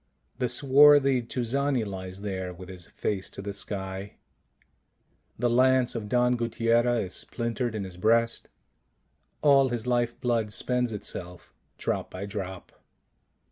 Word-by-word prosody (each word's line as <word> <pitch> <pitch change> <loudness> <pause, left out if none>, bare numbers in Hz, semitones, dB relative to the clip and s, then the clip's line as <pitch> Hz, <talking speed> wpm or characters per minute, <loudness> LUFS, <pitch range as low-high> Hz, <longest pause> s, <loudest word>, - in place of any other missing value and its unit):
The 125 - 0
swarthy 140 0 +6
Tuzani 125 +1 -1
lies 95 -1 -7
there 95 -3 -4
with 90 +1 -11
his 90 -2 -10
face 100 -3 -3
to - - -12
the 100 +1 -5
sky. 95 0 -5 1.2
The 120 - +1
lance 130 +1 +3
of 110 -3 -5
Don 125 0 +3
Guttiera 115 0 +1
is 90 - -8
splintered 115 -1 -3
in 105 - -2
his 95 -2 -8
breast: 115 +4 +2 1.0
all 140 -2 +5
his 120 -2 -3
life 120 -1 0
blood 115 -4 0
spends 125 +1 -1
itself 90 -4 -7 0.2
drop - - -2
by 95 +2 -6
drop. 95 -2 -6
115 Hz, 135 wpm, -27 LUFS, 100-125 Hz, 1.2 s, swarthy